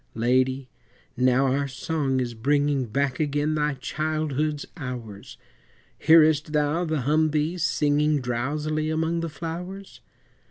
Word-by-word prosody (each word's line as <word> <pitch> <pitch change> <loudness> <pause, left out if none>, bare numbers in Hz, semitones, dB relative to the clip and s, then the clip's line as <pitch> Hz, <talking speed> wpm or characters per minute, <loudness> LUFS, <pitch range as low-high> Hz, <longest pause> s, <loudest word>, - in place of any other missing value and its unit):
Lady! 130 +3 +1 0.5
now 130 +1 +3
our 140 +2 +1
song 135 0 -1
is 120 -2 -2
bringing 140 +2 +1
Back 135 +3 -1
again 150 0 0
thy 150 -2 0
childhood's 155 +1 -2
hours 120 -7 -7 0.6
Hearest 155 -1 +5
thou 150 +3 +1
the 155 -3 -1
humbee 155 +4 +1
singing 150 -1 +2
Drowsily 150 +5 -2
among 160 +1 0
the 165 0 -3
flowers? 175 +6 -7
150 Hz, 115 wpm, -25 LUFS, 130-155 Hz, 0.6 s, Hearest